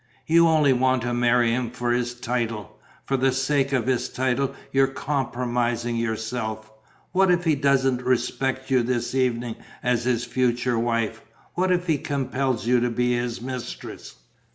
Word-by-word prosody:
"You 170 Hz, +1 st, +5 dB
only 155 Hz, -4 st, +4 dB
want 130 Hz, -1 st, +2 dB
to 120 Hz, 0 st, -1 dB
marry 120 Hz, -1 st, +3 dB
him 120 Hz, 0 st, -1 dB
for 120 Hz, 0 st, -2 dB
his 120 Hz, 0 st, 0 dB
title. 115 Hz, -4 st, -3 dB, 0.3 s
For 135 Hz, -, 0 dB
the 130 Hz, +1 st, +2 dB
sake 135 Hz, +1 st, +1 dB
of 130 Hz, -5 st, +1 dB
his 125 Hz, -1 st, 0 dB
title 130 Hz, +1 st, -1 dB, 0.2 s
you're 135 Hz, 0 st, +4 dB
compromising 120 Hz, -4 st, -1 dB
yourself. 110 Hz, -1 st, -3 dB, 0.4 s
What 190 Hz, 0 st, +3 dB
if 175 Hz, -1 st, +3 dB
he 160 Hz, -2 st, +3 dB
doesn't 135 Hz, -2 st, +2 dB
respect 130 Hz, +1 st, -1 dB
you 130 Hz, -1 st, +4 dB
this 120 Hz, 0 st, -1 dB
evening 120 Hz, -3 st, 0 dB, 0.3 s
as 125 Hz, -1 st, +1 dB
his 120 Hz, -2 st, +1 dB
future 125 Hz, -1 st, 0 dB
wife? 115 Hz, -1 st, -1 dB, 0.3 s
What 185 Hz, +1 st, +1 dB
if 175 Hz, 0 st, +1 dB
he 160 Hz, -5 st, +1 dB
compels 135 Hz, -4 st, -1 dB
you 125 Hz, +1 st, +4 dB
to 120 Hz, +1 st, +1 dB
be 125 Hz, +1 st, +1 dB
his 120 Hz, -1 st, -3 dB
mistress?" 130 Hz, -1 st, -7 dB
125 Hz, 160 wpm, -24 LUFS, 120-135 Hz, 0.4 s, You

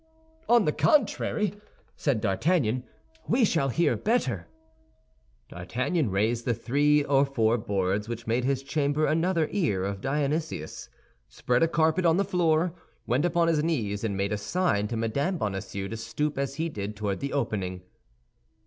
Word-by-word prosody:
"On 235 Hz, -4 st, +5 dB
the 150 Hz, -, +2 dB
contrary," 215 Hz, -, +1 dB, 0.4 s
said 135 Hz, -7 st, 0 dB
D'Artagnan, 125 Hz, -, +1 dB, 0.4 s
"we 240 Hz, 0 st, +3 dB
shall 155 Hz, -8 st, +1 dB
hear 165 Hz, +7 st, +2 dB
better." 130 Hz, -, 0 dB, 1.0 s
D'Artagnan 125 Hz, -, -1 dB
raised 110 Hz, +5 st, 0 dB
the 120 Hz, -1 st, 0 dB
three 145 Hz, +6 st, +2 dB
or 140 Hz, -1 st, +3 dB
four 115 Hz, -5 st, +1 dB
boards 100 Hz, +1 st, -1 dB
which 115 Hz, -1 st, -5 dB
made 115 Hz, +2 st, 0 dB
his 135 Hz, +1 st, 0 dB
chamber 145 Hz, +1 st, 0 dB
another 165 Hz, 0 st, +1 dB
ear 145 Hz, -, 0 dB
of 100 Hz, 0 st, -3 dB
Dionysius, 145 Hz, -, -2 dB, 0.4 s
spread 125 Hz, 0 st, 0 dB
a 165 Hz, -, +5 dB
carpet 160 Hz, +2 st, +2 dB
on 165 Hz, +1 st, +4 dB
the 200 Hz, -, +2 dB
floor, 170 Hz, -2 st, +1 dB, 0.3 s
went 130 Hz, +7 st, +1 dB
upon 170 Hz, -1 st, +2 dB
his 155 Hz, -2 st, +2 dB
knees, 110 Hz, -11 st, -1 dB
and 100 Hz, -3 st, -1 dB
made 100 Hz, +1 st, -1 dB
a 105 Hz, -, -2 dB
sign 105 Hz, -, 0 dB
to 115 Hz, -, -3 dB
Mme. 140 Hz, -, -1 dB
Bonacieux 100 Hz, -3 st, -3 dB
to 115 Hz, -, -5 dB
stoop 150 Hz, +6 st, -2 dB
as 140 Hz, 0 st, -2 dB
he 160 Hz, +3 st, -1 dB
did 105 Hz, -8 st, -5 dB
toward 100 Hz, -2 st, -2 dB
the 140 Hz, -, -3 dB
opening. 95 Hz, -9 st, -2 dB
135 Hz, 155 wpm, -27 LUFS, 105-160 Hz, 1.0 s, On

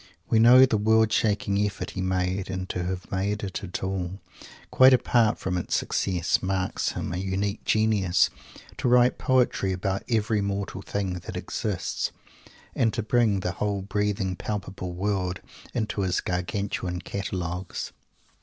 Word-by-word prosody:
We 115 Hz, -, +3 dB
know 125 Hz, +3 st, +8 dB
the 115 Hz, -4 st, +1 dB
world 110 Hz, +1 st, +4 dB
shaking 100 Hz, -2 st, +1 dB
effort 105 Hz, -1 st, -3 dB
he 95 Hz, -, -4 dB
made 95 Hz, +1 st, -1 dB
and 95 Hz, 0 st, -3 dB
to 90 Hz, -, -2 dB
have 90 Hz, 0 st, -5 dB
made 100 Hz, +2 st, -1 dB
it 95 Hz, -1 st, -4 dB
at 90 Hz, -1 st, -5 dB
all, 95 Hz, 0 st, -3 dB, 0.5 s
quite 130 Hz, 0 st, +7 dB
apart 115 Hz, -3 st, +2 dB
from 90 Hz, -1 st, -2 dB
its -, -, -2 dB
success, 90 Hz, -3 st, 0 dB
marks 95 Hz, -1 st, -1 dB
him -, -, -4 dB
a -, -, -2 dB
unique 95 Hz, +2 st, -2 dB
genius! 110 Hz, -5 st, +3 dB, 0.5 s
to 130 Hz, -, -1 dB
write 125 Hz, +1 st, +4 dB
poetry 125 Hz, -7 st, +2 dB
about 95 Hz, +1 st, -2 dB
every 110 Hz, -2 st, +1 dB
mortal 100 Hz, -1 st, -3 dB
thing 95 Hz, -3 st, -3 dB
that -, -, -7 dB
exists, -, -, -2 dB, 0.6 s
and 115 Hz, -, +2 dB
to 115 Hz, -, -1 dB
bring 110 Hz, -3 st, +2 dB
the 90 Hz, -, -1 dB
whole 100 Hz, +1 st, -2 dB
breathing 100 Hz, -1 st, -1 dB
palpable 95 Hz, -3 st, -5 dB
world 95 Hz, -1 st, -1 dB, 0.3 s
into 110 Hz, -3 st, -2 dB
his 90 Hz, -2 st, +1 dB
Gargantuan 90 Hz, 0 st, -2 dB
Catalogues. 90 Hz, -2 st, -4 dB
100 Hz, 150 wpm, -26 LUFS, 95-110 Hz, 0.6 s, know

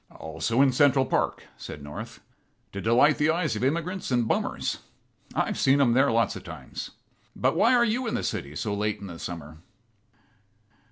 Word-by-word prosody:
"Also 115 Hz, -, 0 dB
in 135 Hz, -, +4 dB
Central 135 Hz, 0 st, +4 dB
Park," -, -, -1 dB
said 75 Hz, -, -8 dB
North, 75 Hz, +1 st, -8 dB, 0.5 s
"to 100 Hz, -, -5 dB
delight 125 Hz, +7 st, +4 dB
the 150 Hz, +1 st, +3 dB
eyes 160 Hz, -6 st, +1 dB
of 105 Hz, -, -3 dB
immigrants 170 Hz, +7 st, -1 dB
and 120 Hz, -3 st, +1 dB
bummers. -, -, -1 dB, 0.6 s
I've -, -, 0 dB
seen 135 Hz, +1 st, +4 dB
em 125 Hz, -4 st, +4 dB
there 135 Hz, +3 st, +4 dB
lots 115 Hz, -2 st, +1 dB
of -, -, -8 dB
times. -, -, -8 dB, 0.5 s
But -, -, +1 dB
why 250 Hz, +3 st, +4 dB
are 240 Hz, -1 st, +4 dB
you 240 Hz, +2 st, -1 dB
in -, -, -1 dB
the -, -, -2 dB
city 70 Hz, +2 st, -4 dB
so 105 Hz, +7 st, -2 dB
late 105 Hz, +1 st, -1 dB
in 100 Hz, -, -8 dB
the 85 Hz, -3 st, -8 dB
summer?" 80 Hz, -3 st, -7 dB
125 Hz, 180 wpm, -26 LUFS, 100-150 Hz, 0.6 s, in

